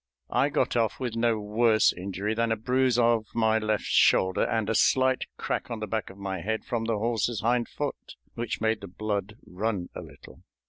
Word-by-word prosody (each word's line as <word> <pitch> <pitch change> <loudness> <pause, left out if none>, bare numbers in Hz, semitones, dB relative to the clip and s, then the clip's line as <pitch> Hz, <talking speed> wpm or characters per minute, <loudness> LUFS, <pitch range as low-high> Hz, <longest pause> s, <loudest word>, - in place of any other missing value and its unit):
I - - +2
got - - 0
off 115 -3 +1
with 125 -3 -3
no 115 -1 +1
worse 110 +1 +3
injury 100 +3 -3
than 115 0 0
a - - +3
bruise 125 +2 +1
of 115 -2 +3
my 110 -1 +3
left 110 -1 -1
shoulder 95 -1 +3
and 110 -2 -1
a 115 - +1
slight 130 +3 +3
crack - - -3
on 115 -2 -4
the 110 - -3
back 110 0 -3
of 95 - -13
my 95 -3 -4
head 110 +4 -2
from 120 -2 -2
the 115 -1 0
horse's 115 +1 -1
hind 120 +1 +1
foot, 145 -1 -5 0.2
which 115 -1 -4
made 110 -1 +1
the 100 - -7
blood 105 +2 -4
run 95 -1 -3
a - - -6
little. - - -14
110 Hz, 200 wpm, -27 LUFS, 105-115 Hz, 0.2 s, worse